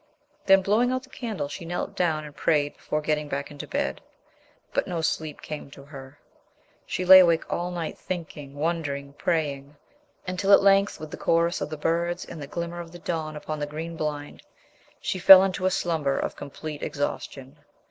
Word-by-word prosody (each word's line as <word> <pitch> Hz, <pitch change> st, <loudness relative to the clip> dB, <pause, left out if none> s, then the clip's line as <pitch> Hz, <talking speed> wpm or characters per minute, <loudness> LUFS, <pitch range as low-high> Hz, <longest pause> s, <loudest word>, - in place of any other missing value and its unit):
Then, 195 Hz, 0 st, +6 dB
blowing 225 Hz, +6 st, +2 dB
out 255 Hz, 0 st, -2 dB
the 265 Hz, -, -17 dB
candle, 215 Hz, -, -4 dB
she 145 Hz, +3 st, -7 dB
knelt 175 Hz, +2 st, -4 dB
down 160 Hz, -4 st, 0 dB
and 145 Hz, -1 st, -11 dB
prayed 145 Hz, -2 st, +1 dB
before 150 Hz, -, -3 dB
getting 150 Hz, 0 st, -1 dB
back 140 Hz, +1 st, -4 dB
into 145 Hz, -, -8 dB
bed. 70 Hz, 0 st, -2 dB, 0.7 s
But -, -, 0 dB
no 170 Hz, -2 st, -2 dB
sleep 155 Hz, -1 st, -2 dB
came 150 Hz, -2 st, -7 dB
to 140 Hz, 0 st, -13 dB
her. 140 Hz, -1 st, -12 dB, 0.7 s
She 185 Hz, -, -2 dB
lay 190 Hz, +1 st, +11 dB
awake 170 Hz, -3 st, +4 dB
all 175 Hz, +1 st, -2 dB
night 175 Hz, -3 st, -5 dB
thinking, 155 Hz, -6 st, -6 dB
wondering, 145 Hz, -3 st, -2 dB
praying, 145 Hz, -2 st, -2 dB, 0.5 s
until 195 Hz, +2 st, +2 dB
at 200 Hz, -, +7 dB
length 195 Hz, 0 st, +4 dB
with 155 Hz, 0 st, -8 dB
the -, -, -6 dB
chorus 170 Hz, +1 st, +1 dB
of -, -, -2 dB
the 155 Hz, -, -5 dB
birds 170 Hz, +3 st, -1 dB
and 165 Hz, -, -9 dB
the 140 Hz, -, -6 dB
glimmer 170 Hz, +2 st, -5 dB
of 170 Hz, -1 st, -8 dB
the 175 Hz, -, -10 dB
dawn 160 Hz, -3 st, -4 dB
upon 155 Hz, 0 st, -5 dB
the 145 Hz, -, -2 dB
green 160 Hz, +3 st, -6 dB
blind, 150 Hz, -2 st, -4 dB, 0.6 s
she 185 Hz, -, -3 dB
fell 190 Hz, +1 st, +10 dB
into 185 Hz, -1 st, 0 dB
a -, -, +4 dB
slumber 160 Hz, -6 st, 0 dB
of -, -, -2 dB
complete 150 Hz, +1 st, -7 dB
exhaustion. 140 Hz, 0 st, -4 dB
160 Hz, 190 wpm, -26 LUFS, 145-175 Hz, 0.7 s, lay